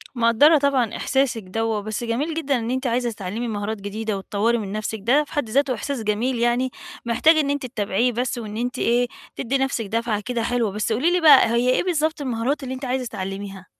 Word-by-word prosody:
مقدّرة 240 +7 +5
طبعًا 265 -6 +1
إحساسِك 265 -5 0
دَوّة، 220 +3 -2
بس 215 +3 -4
جميل 255 +8 -1
جدًا 285 -5 0
إن 230 +2 -3
أنتِ 260 0 -1
عايزة 240 0 0
تتعلّمي 210 +3 -4
مهارات 210 -1 -3
جديدة 210 +1 -3
وتطوّري 210 +4 0
من 205 -4 -5
نفسِك، 215 +1 -3
ده 275 +7 +4
في - - -14
حد 290 -8 -1
ذاته 275 +2 +2
إحساس 245 +1 -4
جميل 230 +4 0
يعني 240 +2 +1 0.3
محتاج 250 +8 +4
إن 295 -3 +1
أنتِ 285 -2 -1
تتابعيه 230 0 0
بس 245 +2 -2
وإن 215 -2 -6
أنتِ 245 +2 -3
إيه، 245 +1 +2 0.3
تدّي 265 +2 -1
نفسِك 265 -4 -1
دفعة 225 0 -1
كده 245 -2 -2
حلوة. 235 -3 0
بس 210 +2 -2
قولي 280 +10 +2
لي 360 0 +2
بقى، 285 -7 +7
هي 235 +2 +2
إيه 255 - +2
بالضبط 315 -4 0
المهارات 260 +2 -1
اللي 260 0 -4
أنتِ 260 +1 -6
عايزة 255 0 -1
تتعلميها؟ 195 -2 -6
240 Hz, 210 wpm, -22 LUFS, 220-265 Hz, 0.3 s, بقى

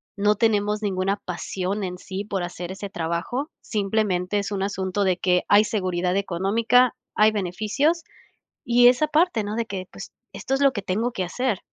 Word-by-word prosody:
no 210 +1 +2
tenemos 210 -1 +1
ninguna 195 0 0
pasión 185 +3 -3
en 180 -1 -4
sí 195 +1 -6
por 195 -3 -3
hacer 175 0 -6
ese 200 +1 -6
trabajo, 170 - -3
simplemente 205 -3 0
es 200 0 -2
un 195 -1 -2
asunto 195 0 -1
de 185 -2 +2
que 180 -1 +2
hay 205 +1 +6
seguridad 185 -4 -1
económica, 220 +6 +2 0.2
hay 215 +1 +5
beneficios, 215 - 0 0.6
y 245 0 +5
esa 255 +5 +4
parte, 305 - +2
¿no?, 210 +1 -4
de 230 -1 -1
que, 190 -3 -6
pues, - - -10 0.2
esto 270 - -4
es 270 - +1
lo 275 -1 +5
que 205 - -4
tengo 220 +6 -1
que 185 -5 -2
hacer. 225 +1 -1
205 Hz, 180 wpm, -24 LUFS, 185-225 Hz, 0.6 s, hay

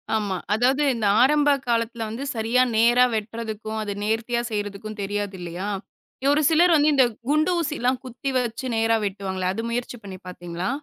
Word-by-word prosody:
ஆமா. 205 -3 -1 0.2
அதாவது 260 +6 +2
இந்த 215 -3 0
ஆரம்ப 295 +2 +4 0.2
காலத்தில் 230 -1 0
வந்து 235 +5 -5
சரியாக 240 +3 +2
நேராக 240 +2 +5
வெட்றதுக்கும் 220 0 -4
அதை 205 -1 -3
நேர்த்தியாக 230 +2 -1
செய்றதுக்கும் 205 +1 -4
தெரியாது 205 0 -3
இல்லையா, 175 +4 -5 0.6
ஒரு 305 - +2
சிலர் 340 +2 +5
வந்து 300 0 +4
இந்தக் 245 -5 +3
குண்டு 310 +4 +3
ஊசி 305 -2 -1
எல்லாம் 250 +1 +1
குத்தி 255 +2 -5
வைச்சு 245 +1 -2
நேராக 225 0 +2
வெட்டுவாங்களே. 190 -2 -2
அது 225 - -3
முயற்சி 245 +1 -3
பண்ணி 190 -2 -8
பார்த்தீங்களா? 175 +1 -5
225 Hz, 160 wpm, -24 LUFS, 205-250 Hz, 0.6 s, நேராக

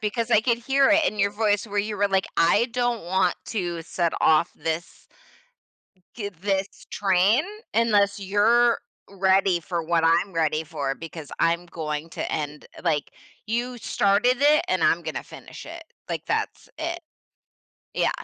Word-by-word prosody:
because 225 +2 -2
I 215 - +5
could 235 0 +1
hear 270 +3 +3
it 315 +1 +4
in 215 - -1
your 200 0 +2
voice 205 0 +1
where 205 -1 -6
you 210 +1 -1
were 205 - +2
like, 195 -1 +1
"I 205 +7 +4
don't 245 -2 0
want 185 0 +1
to 175 -6 -3
set 170 0 -1
off 155 -1 +4
this" 160 +2 -5 1.1
"get 200 -6 -7
this 195 -1 -2
train, 195 +6 +3 0.3
unless 205 -3 +2
you're 225 +5 +3 0.3
ready 190 -2 +2
for 170 +1 -3
what 165 0 +1
I'm 170 +4 +3
ready 155 -2 0
for 145 -3 -3
because 160 -1 -9
I'm 170 +1 +1
going 160 -1 -5
to - - -4
end 150 -1 -4 0.2
,like, 150 -4 0 0.3
you 240 +2 -2
started 215 +3 +2
it, 300 +1 +5
and - - +1
I'm - - +3
gonna - - -4
finish - - -11
it." 335 0 -9 0.3
Like, - - -3
that's - - -2
it. 335 +2 -3 0.9
Yeah. - - +2
195 Hz, 160 wpm, -24 LUFS, 165-230 Hz, 1.1 s, I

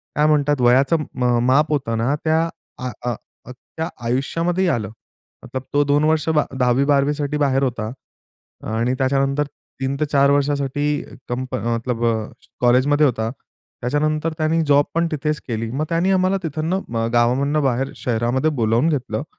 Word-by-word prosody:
काय 150 - +3
म्हणतात, 145 -2 +2
वयाचं 130 +6 +4 0.2
म 125 - -2
अ, - - +2
माप 150 +4 +3
होतं 120 -6 -1
ना, 125 +6 +1
त्या 160 +1 +2 0.3
त्या 125 0 -3 0.9
अ, - - -3
अ, - - -7 0.2
आयुष्यामध्येही 165 +9 0
आलं. 110 - -1 0.8
तो 145 0 +4
2 145 +1 +2
वर्ष, 155 0 +1
बा 150 -2 +2
10वी 125 +2 +3
12 140 0 +3
साठी 150 0 -2
बाहेर 135 -2 +2
होता 115 -4 -2 0.8
आणि 120 +3 +1
त्याच्यानंतर 135 +2 +1 0.4
3-4 140 +1 +2
वर्षांसाठी 145 0 0 0.4
कंपनी 125 -2 -3
मतलब 115 0 -2 0.6
कॉलेजमध्ये 130 +5 +4
होता. 110 -4 0 0.5
त्याच्यानंतर 155 +5 0
त्याने 160 +1 +1
जॉब 145 0 +5
पण 170 +1 +1
तिथेच 150 0 -1
केली. 115 -2 -3
मग 150 +4 -1
त्याने 170 +3 +1
आम्हाला 185 +1 +2
तिथनं 160 +5 -2 0.2
अ, 115 0 0
गावामधून 130 +6 +2
बाहेर 135 0 0
शहरामध्ये 120 +5 0
बोलावून 115 +7 +2
घेतलं, 140 -2 -2
140 Hz, 145 wpm, -21 LUFS, 125-155 Hz, 0.9 s, जॉब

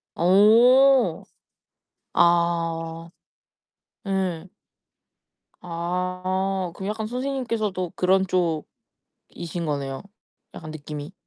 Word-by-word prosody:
어. 240 +9 +5 0.9
아. 165 -1 +1 1.0
예. 185 -3 -2 1.1
아 185 +2 -2
그럼 195 +1 -6
약간 215 0 -3
선생님께서도 230 -8 -3
그런 190 +1 +2
쪽이신 170 -4 -2 0.8
거네요 140 -2 -3 0.5
약간 155 -2 -8
느낌이. 150 +1 -8
185 Hz, 145 characters per minute, -24 LUFS, 165-200 Hz, 1.1 s, 어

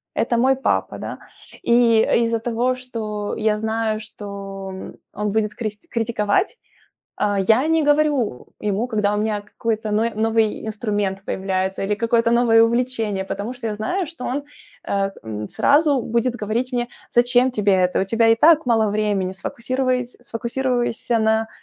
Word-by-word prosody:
это 235 - +1
мой 265 +3 +4
папа, 270 - -1
да. - - -6 0.5
И 235 -2 +5 0.2
из-за 230 0 0
того, 240 +2 0
что 220 -5 -5
я 215 -1 +1
знаю, 220 0 -1
что, 200 -2 -8
м, 190 - -8 0.2
он 210 0 -2
будет 215 0 0
крист 215 +7 -6
критиковать, 225 - 0 0.6
а, 205 -1 0
я 225 +8 +3
не 325 -1 +3
говорю 290 - +1 0.2
ему, 210 +3 0
когда 210 -2 +1
у - - 0
меня 210 -1 -1
какой-то 220 0 -3
ной 225 +2 +2
новый 220 0 +1
инструмент 205 -3 -2
появляется 190 0 -2
или 210 - 0
какое-то 230 +1 +1
новое 235 -1 +5
увлечение, 230 -4 0
потому 205 +6 -4
что 245 -2 -6
я 210 -1 -2
знаю, 350 - -1
что 330 -5 -9
он, 280 +3 -2 0.5
э, 195 0 0
м, 105 -1 -5
сразу 285 -2 +3
будет 235 +1 0
говорить 230 +5 -1
мне: 240 -1 0 0.2
"Зачем 245 +1 +3
тебе 210 -5 +1
это, 180 -1 +2
у 190 - +1
тебя 225 +3 +2
и 225 - +5
так 320 -2 +6
мало 225 -3 +3
времени, 205 -3 0
сфокусирувайс 250 +5 -2
сфокусируйся 240 0 -1
на, 220 0 +2
225 Hz, 160 wpm, -21 LUFS, 210-245 Hz, 0.6 s, так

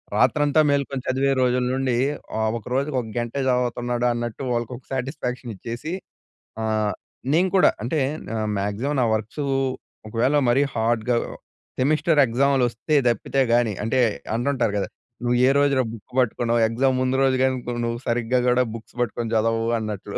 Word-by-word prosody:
రాత్రంతా 145 +1 +3
మేలుకొని 140 -1 0
చదివే 135 +1 +1
రోజుల 125 0 +2
నుండి 130 -2 0 0.4
ఆహ్, 110 0 +1
ఒక 115 - -11
రోజుకి 140 +2 0
ఒక 115 - -9
గంటే 120 +3 -2
చదువుతున్నాడు 125 -1 0
అన్నట్టు 120 +2 -4
వాళ్ళకి 120 0 -2
ఒక 125 - -17
సాటిస్ఫాక్షన్ 125 -2 -3
ఇచ్చేసి, 120 - -6 0.7
ఆహ్, 110 -2 0 0.4
నేను 180 +4 +3
కూడా 185 - +6
అంటే 145 +6 0 0.6
మ్యాక్సిమం 105 +9 -2
నా 120 - +3
వర్క్సు 110 +7 -4 0.6
ఒకవేళ 120 +6 +1
మరీ 135 +4 +4
హార్డ్‌గా 115 +1 +1 0.6
సెమిస్టర్ 150 +3 +3
ఎగ్జామ్‌లొస్తే 125 +2 +1
తప్పితే 120 +4 +1
గాని, 120 -3 +3
అంటే 130 +3 +1 0.4
అంటుంటారు 120 -3 0
గదా! 100 - -2 0.3
నువ్వు 120 0 +2
ఏ - - +5
రోజులో 140 -2 +3
బుక్ 110 0 -13
పట్టుకున్నావు, 120 -1 +1
ఎగ్జామ్ 130 +3 +1
ముందు 130 +1 +1
రోజు 135 -1 +3
గాని, 130 -1 +2
ను 120 - -2
నువ్వు 115 0 -2
సరిగ్గా 120 +1 +1
కూడా 125 +1 +4
బుక్స్ 115 - -11
పట్టుకొని 120 -1 -2
చదవవు 115 +1 +1
అన్నట్లు. 105 -2 -5
125 Hz, 150 wpm, -23 LUFS, 115-135 Hz, 0.7 s, కూడా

